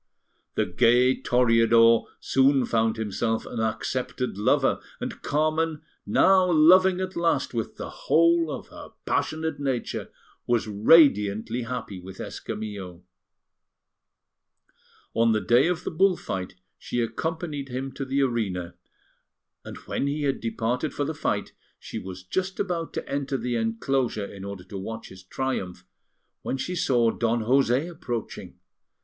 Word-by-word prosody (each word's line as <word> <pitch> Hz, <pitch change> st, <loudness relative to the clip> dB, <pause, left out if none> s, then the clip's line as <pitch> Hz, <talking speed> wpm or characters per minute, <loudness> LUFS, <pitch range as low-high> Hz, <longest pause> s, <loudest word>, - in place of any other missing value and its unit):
The -, -, +1 dB
gay 125 Hz, +2 st, +4 dB
Toreador 115 Hz, -2 st, +4 dB
soon 135 Hz, -1 st, +3 dB
found 115 Hz, -1 st, +1 dB
himself 110 Hz, +1 st, -1 dB
an 120 Hz, -, -6 dB
accepted 125 Hz, +2 st, -2 dB
lover; 105 Hz, -, +2 dB, 0.2 s
and -, -, -6 dB
Carmen, 155 Hz, +1 st, 0 dB, 0.2 s
now 185 Hz, -1 st, +4 dB
loving 180 Hz, +4 st, +6 dB
at 185 Hz, 0 st, -4 dB
last 170 Hz, -5 st, 0 dB
with 115 Hz, -2 st, -3 dB
the -, -, -6 dB, 0.2 s
whole 165 Hz, 0 st, +4 dB
of 145 Hz, -, -6 dB
her -, -, -12 dB
passionate 160 Hz, -1 st, -1 dB
nature, 135 Hz, -4 st, -3 dB, 0.4 s
was 120 Hz, -2 st, +1 dB
radiantly 110 Hz, -1 st, +4 dB
happy 115 Hz, -6 st, -5 dB
with 95 Hz, +1 st, -11 dB
Escamillo. 100 Hz, -5 st, -6 dB, 2.1 s
On 115 Hz, 0 st, +3 dB
the 110 Hz, -, +2 dB
day 120 Hz, +7 st, +4 dB
of 180 Hz, 0 st, -1 dB
the -, -, -3 dB
bull 185 Hz, +2 st, +3 dB
fight 95 Hz, -1 st, -5 dB, 0.2 s
she 120 Hz, -, -3 dB
accompanied 150 Hz, +3 st, -3 dB
him 130 Hz, +2 st, -4 dB
to 135 Hz, -, -5 dB
the 135 Hz, +1 st, 0 dB
arena; 95 Hz, -9 st, -2 dB, 0.9 s
and -, -, -9 dB
when 140 Hz, -, -2 dB
he 145 Hz, +1 st, -2 dB
had 140 Hz, -1 st, 0 dB
departed 120 Hz, +5 st, -2 dB
for 145 Hz, -, -1 dB
the 160 Hz, -, -2 dB
fight, -, -, -2 dB, 0.2 s
she -, -, -7 dB
was 95 Hz, -1 st, -8 dB
just 190 Hz, -, -3 dB
about 175 Hz, -4 st, -2 dB
to -, -, -4 dB
enter 140 Hz, -1 st, -2 dB
the 120 Hz, 0 st, -2 dB
enclosure 115 Hz, 0 st, -1 dB
in 100 Hz, -1 st, -10 dB
order 100 Hz, -2 st, -7 dB
to 95 Hz, +2 st, -8 dB
watch 110 Hz, +3 st, -7 dB
his 95 Hz, 0 st, -12 dB
triumph, 95 Hz, -4 st, -4 dB, 0.6 s
when 135 Hz, -, -3 dB
she 180 Hz, +7 st, -3 dB
saw 125 Hz, -10 st, +2 dB
Don 115 Hz, 0 st, 0 dB
José 130 Hz, +4 st, +2 dB
approaching. 125 Hz, -10 st, -6 dB
125 Hz, 140 wpm, -26 LUFS, 110-155 Hz, 2.1 s, loving